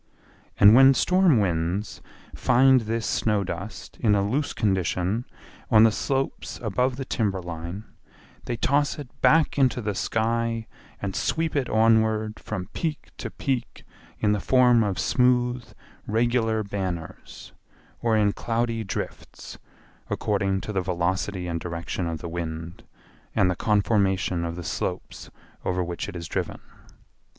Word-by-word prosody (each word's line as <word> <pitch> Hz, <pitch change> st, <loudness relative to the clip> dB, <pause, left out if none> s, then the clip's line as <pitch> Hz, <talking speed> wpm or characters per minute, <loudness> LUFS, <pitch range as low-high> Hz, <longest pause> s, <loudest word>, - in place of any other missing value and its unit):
And 105 Hz, +1 st, +9 dB
when 135 Hz, +2 st, +7 dB
storm 180 Hz, 0 st, +4 dB
winds 90 Hz, +2 st, -1 dB, 0.3 s
find 130 Hz, +1 st, +4 dB
this 115 Hz, 0 st, -2 dB
snow 105 Hz, -2 st, +1 dB
dust 95 Hz, +4 st, -7 dB
in 105 Hz, -4 st, +3 dB
a 100 Hz, 0 st, +1 dB
loose 145 Hz, +7 st, -1 dB
condition 95 Hz, +2 st, 0 dB, 0.4 s
on 110 Hz, -2 st, +7 dB
the 115 Hz, -, +6 dB
slopes 135 Hz, +5 st, -2 dB
above 125 Hz, +4 st, 0 dB
the 135 Hz, 0 st, -5 dB
timber 105 Hz, -7 st, -1 dB
line 85 Hz, +3 st, -6 dB, 0.6 s
they 120 Hz, -, -3 dB
toss 145 Hz, +4 st, +1 dB
it 145 Hz, -4 st, -8 dB
back 155 Hz, -2 st, +4 dB
into 130 Hz, -2 st, +3 dB
the 105 Hz, -3 st, -2 dB
sky 115 Hz, +2 st, -1 dB, 0.3 s
and 100 Hz, -1 st, -4 dB
sweep 160 Hz, -1 st, -1 dB
it 140 Hz, -3 st, 0 dB
onward 110 Hz, -1 st, +2 dB
from 95 Hz, -4 st, -5 dB
peak 160 Hz, -3 st, -4 dB
to -, -, -4 dB
peak 130 Hz, -3 st, -3 dB, 0.3 s
in 105 Hz, -, +2 dB
the 105 Hz, -, +1 dB
form 125 Hz, -2 st, +4 dB
of 100 Hz, -3 st, -1 dB
smooth 125 Hz, +2 st, +1 dB, 0.4 s
regular 115 Hz, 0 st, +1 dB
banners, 95 Hz, -5 st, -6 dB, 0.5 s
or 115 Hz, -2 st, +2 dB
in 105 Hz, -1 st, +3 dB
cloudy 115 Hz, -1 st, -1 dB
drifts, 95 Hz, -, -7 dB, 0.5 s
according 95 Hz, -2 st, 0 dB
to 105 Hz, -, -5 dB
the 95 Hz, -, +1 dB
velocity 90 Hz, +1 st, -1 dB
and 85 Hz, -1 st, -2 dB
direction 85 Hz, +1 st, -4 dB
of 80 Hz, -1 st, -4 dB
the 85 Hz, -, -5 dB
wind, 85 Hz, 0 st, -5 dB, 0.5 s
and 90 Hz, -2 st, +3 dB
the -, -, -2 dB
conformation 95 Hz, -4 st, +1 dB
of 85 Hz, 0 st, -4 dB
the 90 Hz, -, -6 dB
slopes -, -, -4 dB, 0.3 s
over 90 Hz, 0 st, 0 dB
which 85 Hz, 0 st, -4 dB
it -, -, -9 dB
is 85 Hz, -1 st, -6 dB
driven. -, -, -3 dB
105 Hz, 140 wpm, -25 LUFS, 95-120 Hz, 0.6 s, And